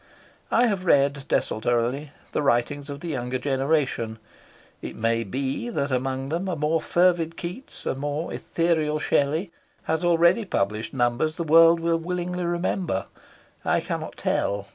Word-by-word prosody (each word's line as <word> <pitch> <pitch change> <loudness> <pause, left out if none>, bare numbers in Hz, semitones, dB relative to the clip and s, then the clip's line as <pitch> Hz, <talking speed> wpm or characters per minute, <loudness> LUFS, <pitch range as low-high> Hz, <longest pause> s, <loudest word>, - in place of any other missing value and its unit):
I 240 - +4
have 200 -5 -1
read 140 -1 +3
desultorily 120 +6 0 0.2
the - - 0
writings 140 +2 0
of 140 0 -6
the 175 - -5
younger 125 -3 -2
generation. 135 -4 0 0.6
It - - -6
may 115 +1 +1
be 135 - -3
that 140 - -2
among 130 +1 -1
them 170 +5 -2
a 180 - -1
more 155 +1 +1
fervid 170 -1 +2
Keats, 180 +11 -7
a - - 0
more 145 +4 -3
ethereal 160 -3 0
Shelley, 155 +5 +1 0.3
has 160 +2 -1
already 170 +4 +4
published 105 - -1
numbers 125 +5 0
the 170 - -2
world 165 +1 +6
will 165 0 +1
willingly 180 +1 -3
remember. 175 - -1 0.6
I - - +2
cannot - - -4
tell. 100 0 -1
150 Hz, 145 wpm, -25 LUFS, 130-170 Hz, 0.6 s, world